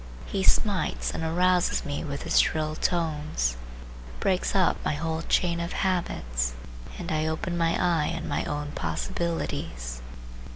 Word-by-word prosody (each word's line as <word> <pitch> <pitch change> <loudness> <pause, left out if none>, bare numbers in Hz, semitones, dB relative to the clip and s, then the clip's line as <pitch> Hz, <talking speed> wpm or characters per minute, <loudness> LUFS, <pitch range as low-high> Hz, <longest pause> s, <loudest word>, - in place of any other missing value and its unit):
He 195 - -2
smites 200 0 +2
and - - -4
arouses 180 +2 +2
me 145 0 -2
with 140 -3 -4
his - - +4
shrill 155 -1 +2
tones, 155 - 0 0.6
breaks 190 +1 +1
up 190 -2 +4
my - - +1
whole 160 +1 -1
chain 170 0 +2
of 170 0 -3
habits, - - 0 0.4
and - - -4
I 155 0 +1
open 160 +2 -2
my 165 -1 +2
eye 170 -4 +2
on 165 - -4
my - - 0
own 145 0 -3
possibilities. 80 - -3
160 Hz, 140 wpm, -27 LUFS, 145-175 Hz, 0.6 s, his